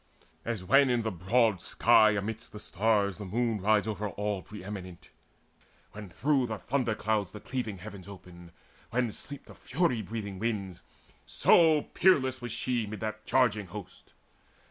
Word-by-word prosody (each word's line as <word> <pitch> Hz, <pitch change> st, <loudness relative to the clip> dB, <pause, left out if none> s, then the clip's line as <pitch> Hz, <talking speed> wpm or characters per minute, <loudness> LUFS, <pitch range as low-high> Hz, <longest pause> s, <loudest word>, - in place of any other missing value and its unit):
As 115 Hz, -5 st, -3 dB
when 135 Hz, +7 st, +5 dB
in 120 Hz, -2 st, +1 dB
the 110 Hz, -, -1 dB
broad 100 Hz, +2 st, +2 dB
sky 110 Hz, +2 st, +4 dB
amidst 110 Hz, +2 st, -4 dB
the 105 Hz, -, -8 dB
stars 105 Hz, -1 st, 0 dB
The 105 Hz, -, -6 dB
moon 115 Hz, +1 st, -1 dB
rides 105 Hz, +1 st, +3 dB
over 105 Hz, -1 st, -3 dB
all 105 Hz, -1 st, -3 dB
pre 105 Hz, -2 st, -10 dB
eminent, 95 Hz, -3 st, -8 dB, 0.8 s
When 105 Hz, -2 st, -9 dB
through 130 Hz, -, +1 dB
the 110 Hz, -1 st, -4 dB
thunderclouds 110 Hz, -6 st, -1 dB
the 105 Hz, -, -8 dB
cleaving 115 Hz, -4 st, -4 dB
heavens 100 Hz, -1 st, -10 dB
Open, 90 Hz, -3 st, -12 dB, 0.4 s
when 120 Hz, -1 st, 0 dB
sleep 145 Hz, +6 st, -6 dB
the -, -, -13 dB
fury 160 Hz, -10 st, 0 dB
breathing 105 Hz, -4 st, -6 dB
winds; 100 Hz, -5 st, -3 dB, 0.5 s
So 160 Hz, -3 st, +5 dB
peerless 130 Hz, -8 st, +3 dB
was 120 Hz, -1 st, -5 dB
she 120 Hz, -2 st, -1 dB
mid 105 Hz, 0 st, -6 dB
that 110 Hz, 0 st, -5 dB
charging 110 Hz, -6 st, +2 dB
host. 100 Hz, +1 st, -11 dB
110 Hz, 155 wpm, -29 LUFS, 100-120 Hz, 0.8 s, when